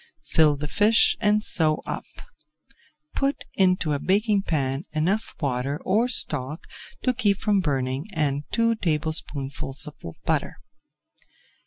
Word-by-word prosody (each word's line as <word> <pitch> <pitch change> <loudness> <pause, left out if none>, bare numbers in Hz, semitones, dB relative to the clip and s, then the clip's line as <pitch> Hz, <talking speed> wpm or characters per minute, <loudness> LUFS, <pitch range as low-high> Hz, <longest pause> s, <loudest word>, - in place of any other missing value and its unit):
Fill 155 -2 +4
the 145 +1 -5
fish 210 +7 +4
and 210 -1 +2
sew 155 -7 +2
up; - - -4 1.1
put 275 +1 -1
into 185 -5 +2
a 145 - -1
baking 205 +3 +2
pan 140 -5 -1
enough 180 +8 -1
water 140 0 -2
or 225 +5 +2
stock 150 - 0 0.4
to 255 - +2
keep 210 -5 +1
from 205 -1 +1
burning 135 -2 -1
and 145 -2 0
two 230 0 +2
tablespoonfuls 150 -5 -1
of 150 - -9 0.3
butter. - - 0
160 Hz, 125 wpm, -24 LUFS, 145-210 Hz, 1.1 s, Fill